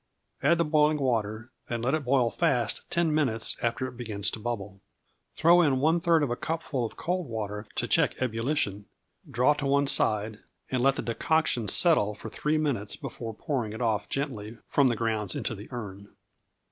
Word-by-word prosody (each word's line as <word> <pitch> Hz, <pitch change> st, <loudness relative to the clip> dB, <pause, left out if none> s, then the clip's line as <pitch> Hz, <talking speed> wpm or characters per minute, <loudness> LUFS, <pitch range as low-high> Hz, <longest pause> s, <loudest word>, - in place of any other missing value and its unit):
Add 170 Hz, +5 st, +4 dB
the 170 Hz, -, +2 dB
boiling 150 Hz, 0 st, +3 dB
water, 110 Hz, -3 st, -1 dB, 0.2 s
and 120 Hz, 0 st, -2 dB
let 130 Hz, -, +1 dB
it 155 Hz, -2 st, 0 dB
boil 125 Hz, -2 st, +3 dB
fast 135 Hz, -10 st, 0 dB
ten 170 Hz, -2 st, +1 dB
minutes 130 Hz, -8 st, +1 dB
after 120 Hz, +3 st, -1 dB
it 125 Hz, -2 st, -8 dB
begins 105 Hz, -5 st, -2 dB
to -, -, -6 dB
bubble. 105 Hz, -4 st, -5 dB, 0.5 s
Throw 175 Hz, +2 st, +6 dB
in 140 Hz, -6 st, +2 dB
one 160 Hz, +5 st, +3 dB
third 165 Hz, -2 st, +3 dB
of 135 Hz, -, -1 dB
a -, -, 0 dB
cupful 155 Hz, -3 st, -3 dB
of 115 Hz, -, -5 dB
cold 180 Hz, 0 st, -2 dB
water 105 Hz, -2 st, -5 dB
to -, -, 0 dB
check -, -, +2 dB
ebullition; 115 Hz, -4 st, -1 dB, 0.4 s
draw 125 Hz, +6 st, +3 dB
to 145 Hz, -1 st, -3 dB
one 140 Hz, +1 st, +3 dB
side, 110 Hz, -4 st, +1 dB, 0.3 s
and 130 Hz, -2 st, 0 dB
let 135 Hz, +1 st, +4 dB
the -, -, -4 dB
decoction 120 Hz, -1 st, +1 dB
settle 105 Hz, -, +3 dB
for 110 Hz, -, -9 dB
three 150 Hz, +5 st, 0 dB
minutes 135 Hz, -10 st, -1 dB
before 115 Hz, -2 st, -7 dB
pouring 120 Hz, -5 st, -2 dB
it 110 Hz, -, -7 dB
off 110 Hz, -4 st, 0 dB
gently 120 Hz, -6 st, -3 dB
from 140 Hz, -2 st, +3 dB
the 120 Hz, -, +1 dB
grounds 110 Hz, -4 st, -1 dB
into 120 Hz, -, -2 dB
the 105 Hz, 0 st, -9 dB
urn. 100 Hz, -5 st, -7 dB
120 Hz, 185 wpm, -28 LUFS, 110-150 Hz, 0.5 s, Throw